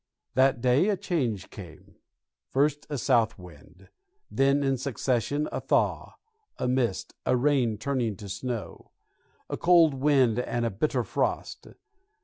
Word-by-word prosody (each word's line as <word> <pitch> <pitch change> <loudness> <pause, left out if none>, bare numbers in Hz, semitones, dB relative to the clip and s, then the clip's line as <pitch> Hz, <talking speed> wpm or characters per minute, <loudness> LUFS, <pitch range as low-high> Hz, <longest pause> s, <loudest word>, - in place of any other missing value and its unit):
That 130 -1 +3
day 130 - +3
a 200 - +1
change 135 - -2
came; - - -12 0.5
first 145 +2 0
a 145 - -3
south 120 -4 +2
wind, 90 +1 -15 0.4
then 140 +1 +2
in 135 -1 +1
succession 130 +2 -1
a - - -3
thaw, - - 0 0.4
a - - -2
mist, 125 -5 -1
a 125 - +2
rain 125 -5 +1
turning 120 -2 -1
to 100 +2 -10
snow, 115 -1 -6 0.6
a - - -4
cold 170 -3 +5
wind 135 -4 +2
and 120 -1 -2
a 115 - -1
bitter 110 +11 -1
frost. - - -3
130 Hz, 135 wpm, -27 LUFS, 115-140 Hz, 0.6 s, cold